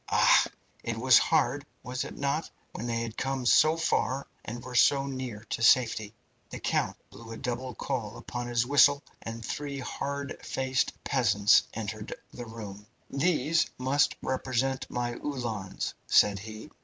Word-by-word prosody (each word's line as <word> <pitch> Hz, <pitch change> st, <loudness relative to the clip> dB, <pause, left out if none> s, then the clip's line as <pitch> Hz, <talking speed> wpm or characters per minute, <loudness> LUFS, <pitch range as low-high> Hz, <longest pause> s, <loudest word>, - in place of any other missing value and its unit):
Ah! -, -, +5 dB, 0.4 s
it 115 Hz, -1 st, -3 dB
was 130 Hz, +2 st, +6 dB
hard, 145 Hz, -3 st, +1 dB, 0.2 s
was 125 Hz, +1 st, -3 dB
it -, -, -8 dB
not, 140 Hz, +3 st, -1 dB, 0.2 s
when 120 Hz, -, -5 dB
they 115 Hz, -1 st, -1 dB
had 115 Hz, -1 st, -5 dB
come 135 Hz, -1 st, -2 dB
so 155 Hz, +6 st, +5 dB
far 140 Hz, -4 st, 0 dB, 0.2 s
and 120 Hz, +2 st, -6 dB
were 125 Hz, -, -8 dB
so 135 Hz, +3 st, +4 dB
near 130 Hz, -6 st, -5 dB
to -, -, -2 dB
safety?" 110 Hz, -2 st, +3 dB, 0.3 s
The -, -, -7 dB
count -, -, 0 dB
blew 115 Hz, -1 st, -12 dB
a 115 Hz, -, -6 dB
double 125 Hz, 0 st, -4 dB
call 110 Hz, -2 st, -3 dB
upon 120 Hz, +1 st, -5 dB
his 120 Hz, -1 st, +1 dB
whistle, 140 Hz, +1 st, +5 dB, 0.2 s
and 115 Hz, -1 st, -6 dB
three 145 Hz, +2 st, -4 dB
hard 140 Hz, +1 st, -4 dB
faced 130 Hz, 0 st, 0 dB
peasants 110 Hz, -7 st, +4 dB
entered 110 Hz, -1 st, -5 dB, 0.2 s
the 120 Hz, -1 st, -7 dB
room. 105 Hz, -2 st, -9 dB, 0.2 s
"These 160 Hz, +2 st, +2 dB
must 140 Hz, +3 st, +2 dB
represent 130 Hz, 0 st, -1 dB
my 120 Hz, -1 st, -2 dB
Uhlans," 115 Hz, -9 st, -3 dB
said 100 Hz, -1 st, +5 dB
he. 110 Hz, +7 st, -9 dB
125 Hz, 155 wpm, -29 LUFS, 115-135 Hz, 0.4 s, was